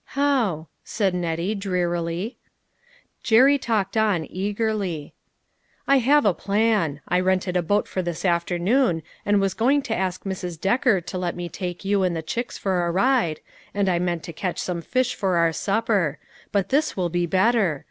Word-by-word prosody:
"How?" 235 - +1 0.2
asked 200 -4 -1
Nettie, 175 +2 -1
drearily. 180 0 -2 0.8
Jerry 265 +5 +5
talked 215 -5 -1
on 210 -7 +2
eagerly. 200 -5 -2 0.4
" - - -41
I 275 0 +5
have 285 +3 +4
a 200 - +4
plan; 200 -7 0
I 180 - +2
rented 185 0 0
a 180 - +3
boat 205 +5 +1
for 185 - -2
this 175 +1 -4
afternoon, 175 - +1 0.2
and 205 0 +4
was 195 -1 0
going 270 +7 +2
to 225 - -2
ask 185 -1 -2
Mrs. 180 -4 -5
Decker 215 - +2
to 180 +2 -6
let 175 -1 -2
me 175 -1 -5
take 180 +1 -6
you 200 0 +2
and 180 -2 +1
the 160 - -3
chicks 235 +9 -4
for 185 -3 0
a - - 0
ride, 195 - +1 0.3
and 200 -1 +1
I 175 -2 +2
meant 175 -2 -1
to 170 - -7
catch 180 +2 -3
some 175 -2 -3
fish 255 +8 0
for 190 -3 0
our 165 -1 +3
supper; 200 -7 0 0.3
but 200 -2 0
this 290 -1 +1
will 180 -2 0
be 175 +1 0
better. 190 - +2
190 Hz, 180 wpm, -23 LUFS, 175-220 Hz, 0.8 s, Jerry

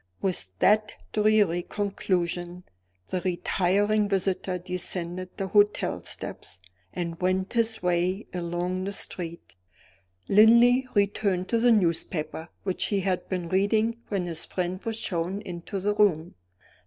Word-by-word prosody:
With 180 - -1
that 215 - +3 0.2
dreary 210 -5 +3
conclusion 180 -3 -2 0.5
the 185 - -2
retiring 200 +3 +1
visitor 190 -1 0
descended 180 0 -4
the 195 -1 -3
hotel 205 +1 +2
steps, 95 - -6 0.3
and 170 -1 -5
went 185 +2 0
his 225 -3 +1
way 180 +3 0
along 180 +1 -2
the 200 - -3
street. 170 - -2 0.7
Linley 235 +5 +6
returned 200 -2 +1
to 230 - +2
the 240 +1 +4
newspaper 165 -4 0
which 185 -2 -1
he 200 -2 0
had 185 -1 -2
been 180 -3 -2
reading 215 +5 +1
when 195 -4 -2
his 165 -2 -3
friend 185 +1 -3
was 225 -1 0
shown 180 -1 -2
into 180 0 -6
the 205 +2 0
room. 175 -6 +2
185 Hz, 130 wpm, -26 LUFS, 175-205 Hz, 0.7 s, Linley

